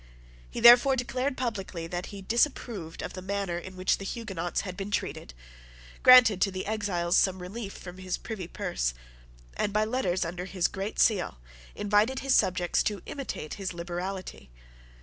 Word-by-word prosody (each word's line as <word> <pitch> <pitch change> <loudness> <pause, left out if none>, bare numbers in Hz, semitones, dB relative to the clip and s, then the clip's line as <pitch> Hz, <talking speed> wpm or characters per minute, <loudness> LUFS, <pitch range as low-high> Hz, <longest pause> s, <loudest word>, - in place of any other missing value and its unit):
He - - -5
therefore 245 +3 +8
declared 255 +2 -2
publicly 195 -9 -3
that 175 +2 -4
he 200 -1 -9
disapproved 225 - -1
of - - -5
the 185 - -7
manner 195 -2 -2
in 185 +1 -10
which 185 0 +1
the - - -6
Huguenots 195 -5 -3
had 185 -2 -6
been 195 +1 -5
treated, 60 - -3 0.7
granted 245 -6 +8
to 200 - +4
the 185 -1 -5
exiles 195 -5 0
some 190 -1 +3
relief 200 +3 -6
from 180 0 -10
his 185 -1 -3
privy 205 -7 -6
purse, - - -2 0.6
and, 205 - -1
by 215 +1 +2
letters 195 -7 0
under 175 +2 -5
his 185 -2 0
great 195 +2 -5
seal, 200 - +2 0.4
invited 210 +6 +2
his 270 -1 +1
subjects 180 -1 +2
to 205 -3 -2
imitate 260 - -5
his 190 -3 -5
liberality. 175 - -5
195 Hz, 165 wpm, -28 LUFS, 180-220 Hz, 0.7 s, therefore